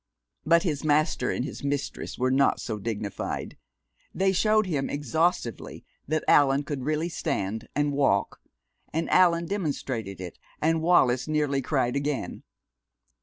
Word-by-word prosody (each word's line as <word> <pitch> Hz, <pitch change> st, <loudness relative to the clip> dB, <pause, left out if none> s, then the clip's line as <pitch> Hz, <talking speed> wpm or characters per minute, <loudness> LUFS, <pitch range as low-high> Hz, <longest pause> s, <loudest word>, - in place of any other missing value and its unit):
But 170 Hz, +2 st, +5 dB
his 155 Hz, -6 st, -2 dB
master 150 Hz, -4 st, +2 dB
and 125 Hz, -, -1 dB
his -, -, -7 dB
mistress 140 Hz, 0 st, -3 dB
were 130 Hz, +1 st, +1 dB
not 135 Hz, +1 st, +3 dB
so 110 Hz, -2 st, -4 dB
dignified. 105 Hz, -2 st, -4 dB, 0.6 s
They 190 Hz, 0 st, +2 dB
showed 215 Hz, +3 st, +3 dB
him 150 Hz, -7 st, -2 dB
exhaustively 145 Hz, -2 st, -1 dB, 0.2 s
that 155 Hz, +2 st, 0 dB
Allan 140 Hz, 0 st, +4 dB
could 145 Hz, -2 st, -4 dB
really 155 Hz, +2 st, 0 dB
stand 110 Hz, -, -3 dB
and 145 Hz, 0 st, +1 dB
walk, 135 Hz, -8 st, +1 dB, 0.5 s
and 160 Hz, +2 st, -1 dB
Allan 170 Hz, -2 st, +4 dB
demonstrated 135 Hz, -, -3 dB
it, 90 Hz, -2 st, -8 dB, 0.2 s
and 160 Hz, +1 st, +1 dB
Wallis 130 Hz, -7 st, +3 dB
nearly 150 Hz, -3 st, 0 dB
cried 130 Hz, -2 st, 0 dB
again. 140 Hz, -9 st, -2 dB
145 Hz, 135 wpm, -26 LUFS, 125-160 Hz, 0.6 s, But